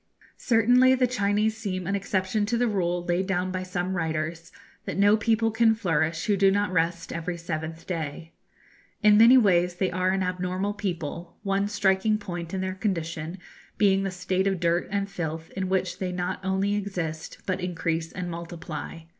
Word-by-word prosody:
Certainly 245 +3 +5
the 255 -1 +3
Chinese 215 -2 +1
seem 190 -5 -4
an 195 - -1
exception 200 +1 0
to 235 +2 +1
the 245 +1 +2
rule 175 -4 -1
laid 180 +2 0
down 185 -1 0
by 185 0 -2
some 185 0 -3
writers, 160 0 -3 0.3
that - - -4
no 205 +1 +5
people 225 +1 +1
can 225 0 +4
flourish 165 -6 0
who 210 -3 +2
do 195 0 +4
not 200 -1 +1
rest 170 -1 0
every 170 +1 -3
seventh 165 -1 -5
day. 165 -1 -5 0.7
In 210 0 +7
many 235 +3 +8
ways 180 -6 +3
they 185 +1 0
are 185 +1 +1
an 190 0 +1
abnormal 185 +2 -2
people, 170 -4 -5
one 200 0 +1
striking 205 +1 +2
point 175 -5 -6
in 190 - -2
their 185 0 -2
condition 170 -4 -3 0.4
being 195 -2 +4
the 195 - -1
state 185 +1 -1
of 190 -2 0
dirt 170 0 +1
and 200 0 -1
filth 165 -4 -5
in 190 -1 -3
which 185 -1 -1
they 185 -1 -2
not 180 +1 -3
only 190 +1 0
exist, 180 -6 -4
but 185 -1 -1
increase 165 -2 -2
and 180 0 -5
multiply. 165 -1 -7
185 Hz, 180 wpm, -26 LUFS, 170-205 Hz, 0.7 s, many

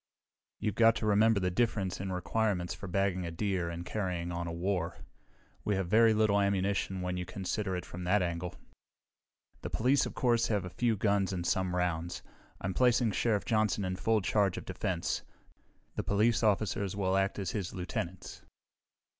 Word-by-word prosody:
You've 105 - -1
got 115 +2 +5
to 115 - -3
remember 105 +1 +4
the 90 -1 0
difference 100 -3 0
in 95 -1 -3
requirements 90 -1 -1
for 100 +2 -8
bagging 95 0 0
a 85 - -3
deer 90 0 -1
and 85 +1 -6
carrying 90 -3 -2
on 85 0 -3
a - - -3
war. 90 0 -2 0.7
We 105 - +1
have 95 -2 -2
very 115 +2 +6
little 105 -2 +3
ammunition 100 -1 0
when 90 0 -2
you 90 - -2
consider 95 +1 -2
it 90 - -4
from 90 +1 -7
that 100 +2 +3
angle. 85 0 -3 1.1
"The - - -4
police, 130 +4 +2
of - - -8
course, 120 -2 +2
have 100 -4 0
a 90 - -7
few 115 +2 +1
guns 100 -2 +1
and 90 -2 -3
some 95 0 0
rounds. 85 -1 -1 0.4
I'm 95 -1 -2
placing 120 0 +3
Sheriff 105 -1 +1
Johnson 110 -3 +1
in 90 0 -2
full 110 +4 +1
charge 100 -1 +1
of - - -6
defense. - - -2 0.7
The - - -3
police 110 +3 +2
officers 100 -2 +1
will 95 -2 +1
act 95 0 +1
as 95 -5 -2
his 95 -4 -3
lieutenants." 90 0 -5
95 Hz, 180 wpm, -31 LUFS, 90-105 Hz, 1.1 s, very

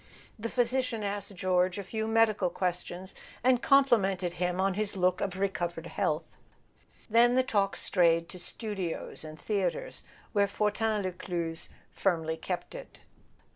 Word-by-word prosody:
The 230 +2 -3
physician 245 -2 0
asked 200 0 -3
George 185 0 +2
a 200 - -3
few 220 +3 -3
medical 220 -4 +3
questions, 180 +1 -3 0.3
and 250 -1 +4
complimented 195 -11 +4
him 180 +1 -1
on 195 0 +2
his 205 0 -1
look 180 0 +2
of 190 -2 -2
recovered 175 -4 -2
health; - - -2 0.7
then 235 +2 +5
the 260 - +4
talk 200 -5 +1
strayed 170 -2 +3
to 180 - -8
studios 190 -3 -4
and 155 0 -9
threatres, 215 - -2 0.3
where 200 -2 +4
Fortin 210 +1 0
Lescluze 175 -3 -3 0.2
firmly 160 -4 0
kept 180 +2 -4
it. - - -10
195 Hz, 135 wpm, -30 LUFS, 180-220 Hz, 0.7 s, then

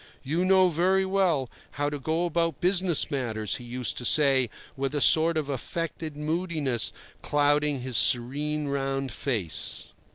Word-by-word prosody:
"You 160 +6 -1
know 190 0 +5
very 185 +3 +1
well 185 -8 +1 0.3
how 145 +1 -1
to 145 - -4
go 160 +5 -1
about 165 -3 -1
business 180 -2 +1
matters," 110 -6 -2
he - - -11
used 125 0 -4
to - - -7
say, 135 -2 +4 0.3
with 135 +1 -3
a - - +1
sort 160 +3 +4
of 155 -3 -2
affected 155 +2 -5
moodiness 150 - -1 0.3
clouding 145 -1 +1
his 125 -1 -1
serene 145 +4 +3
round 135 -1 -2
face. 110 - -2
145 Hz, 150 wpm, -26 LUFS, 135-165 Hz, 0.3 s, know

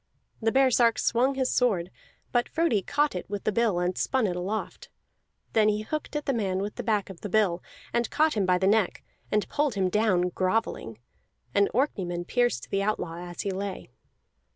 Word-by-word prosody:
The 225 0 +2
baresark 250 -3 +4
swung 255 +4 +2
his 260 -1 0
sword, 190 -8 +1 0.4
but 240 -1 +1
Frodi 325 -11 +1
caught 295 +9 +1
it 180 - -6
with 205 -1 -4
the - - +1
bill 225 -4 +1
and 180 +1 0
spun 260 -4 +1
it 180 -3 -1
aloft; 195 +5 -4 0.6
then 215 -1 +4
he 210 0 0
hooked 305 +5 -4
at 295 - -2
the 275 - +1
man 195 -6 -1
with 200 +2 -3
the - - -5
back 210 -3 0
of 175 - -13
the 205 - -5
bill, 185 -4 +2 0.3
and 235 -1 +1
caught 310 0 +2
him 200 -4 0
by 180 -1 +4
the 190 - 0
neck, 205 -1 +2 0.3
and 210 -1 +1
pulled 290 -5 0
him 190 -2 +1
down 190 -4 +2
grovelling. 185 - -1 0.6
An 200 0 +4
Orkneyman 185 -10 -1
pierced 240 - 0
the 195 - +1
outlaw 195 -5 -2
as 175 - -5
he 200 - -2
lay. 190 -6 -5
210 Hz, 195 wpm, -27 LUFS, 185-240 Hz, 0.6 s, baresark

